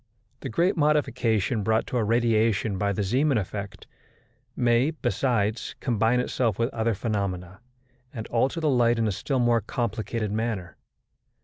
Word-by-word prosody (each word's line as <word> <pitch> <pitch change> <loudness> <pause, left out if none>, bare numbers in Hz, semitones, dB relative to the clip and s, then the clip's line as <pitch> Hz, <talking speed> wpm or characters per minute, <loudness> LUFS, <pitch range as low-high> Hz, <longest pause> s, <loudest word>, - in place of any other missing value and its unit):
The - - -5
great 170 - +1
modification 125 - +1
brought 110 +2 +1
to 125 - -3
a 115 - +2
radiation 110 -3 +1
by 100 +1 +1
the 100 +1 -1
Zeeman 130 +7 +2
effect 100 -1 -5 0.7
may, 120 +3 +3
besides, 120 -8 -1
combine 115 -1 +1
itself 120 -4 0
with 115 +3 -1
other 115 -1 0
phenomena, 95 -4 -3 0.5
and 110 -4 -6
alter 130 +7 +1
the 160 - 0
light 120 -4 +3
in 115 -1 +1
a - - +1
still 135 +8 -2
more 120 -2 +3
complicated 110 0 -3
manner. 105 -5 -3
115 Hz, 145 wpm, -26 LUFS, 105-125 Hz, 0.7 s, may